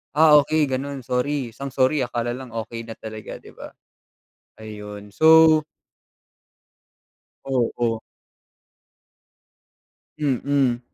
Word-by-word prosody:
"Ah 155 Hz, -1 st, +7 dB
okey 150 Hz, 0 st, +1 dB
ganun 135 Hz, +1 st, -4 dB
sorry", 125 Hz, +1 st, -1 dB
isang 135 Hz, +3 st, -8 dB
sorry 135 Hz, +3 st, +2 dB
akala 120 Hz, 0 st, -3 dB
lang 130 Hz, -4 st, -10 dB
okey 115 Hz, 0 st, -6 dB
na 115 Hz, -, -8 dB
talaga 110 Hz, -1 st, -8 dB
di -, -, -14 dB
ba? -, -, -11 dB, 0.9 s
Ayun 105 Hz, -1 st, -10 dB
so 160 Hz, -1 st, +6 dB, 1.8 s
Oo. 120 Hz, -3 st, -1 dB, 2.2 s
Mm. 135 Hz, -3 st, 0 dB
130 Hz, 95 wpm, -22 LUFS, 115-145 Hz, 2.2 s, Ah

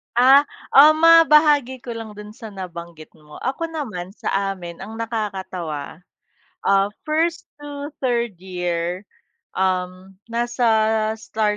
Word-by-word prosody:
Ah, 270 Hz, +4 st, +6 dB, 0.2 s
um, 310 Hz, +3 st, +7 dB
mabahagi 300 Hz, -6 st, +5 dB
ko 240 Hz, -, -6 dB
lang 225 Hz, -2 st, -7 dB
do'n 210 Hz, 0 st, -10 dB
sa 220 Hz, +1 st, -10 dB
nabanggit 170 Hz, -4 st, -9 dB
mo. 150 Hz, -1 st, -16 dB
Ako 270 Hz, +6 st, -2 dB
naman 215 Hz, -, -6 dB
sa 195 Hz, 0 st, -1 dB
amin 175 Hz, -2 st, -10 dB
ang 215 Hz, +3 st, -8 dB
nakakatawa, 190 Hz, -10 st, -5 dB, 0.7 s
ah, 195 Hz, 0 st, +4 dB, 0.2 s
first 325 Hz, +2 st, 0 dB, 0.2 s
to 290 Hz, 0 st, -7 dB
third 235 Hz, -4 st, 0 dB
year, 180 Hz, 0 st, -3 dB, 0.5 s
um, 185 Hz, 0 st, -2 dB
nasa 240 Hz, +1 st, -1 dB, 0.5 s
star 215 Hz, -1 st, -1 dB
215 Hz, 120 wpm, -21 LUFS, 185-270 Hz, 0.7 s, um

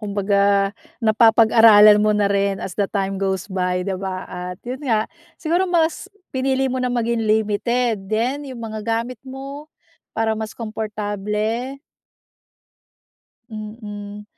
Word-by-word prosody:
kumbaga 200 Hz, -1 st, +1 dB, 0.3 s
napapag-aralan 220 Hz, -1 st, +7 dB
mo 210 Hz, 0 st, +2 dB
na 200 Hz, -1 st, +2 dB
rin 200 Hz, 0 st, +1 dB
as 185 Hz, -, -5 dB
the 200 Hz, +2 st, -1 dB
time 195 Hz, -2 st, -2 dB
goes 190 Hz, -2 st, -1 dB
by, 180 Hz, -2 st, -1 dB
di 195 Hz, -, -2 dB
ba, 185 Hz, 0 st, -4 dB
at 180 Hz, 0 st, -7 dB
'yon 255 Hz, +2 st, -5 dB
nga, 225 Hz, -7 st, +1 dB, 0.3 s
siguro 345 Hz, +3 st, 0 dB
mas 335 Hz, -2 st, 0 dB, 0.2 s
pinili 265 Hz, 0 st, 0 dB
mo 260 Hz, -1 st, -1 dB
na 250 Hz, -, 0 dB
maging 235 Hz, -1 st, 0 dB
limited 220 Hz, 0 st, 0 dB
din 255 Hz, +7 st, -1 dB
'yong 255 Hz, -3 st, -8 dB
mga 220 Hz, -1 st, -5 dB
gamit 230 Hz, +2 st, -2 dB
mo 275 Hz, +3 st, -9 dB, 0.5 s
para 225 Hz, 0 st, +1 dB
mas 220 Hz, 0 st, -5 dB
komportable. 215 Hz, +3 st, -3 dB, 1.7 s
Mm. 210 Hz, -1 st, -8 dB
215 Hz, 130 wpm, -21 LUFS, 200-245 Hz, 1.7 s, napapag-aralan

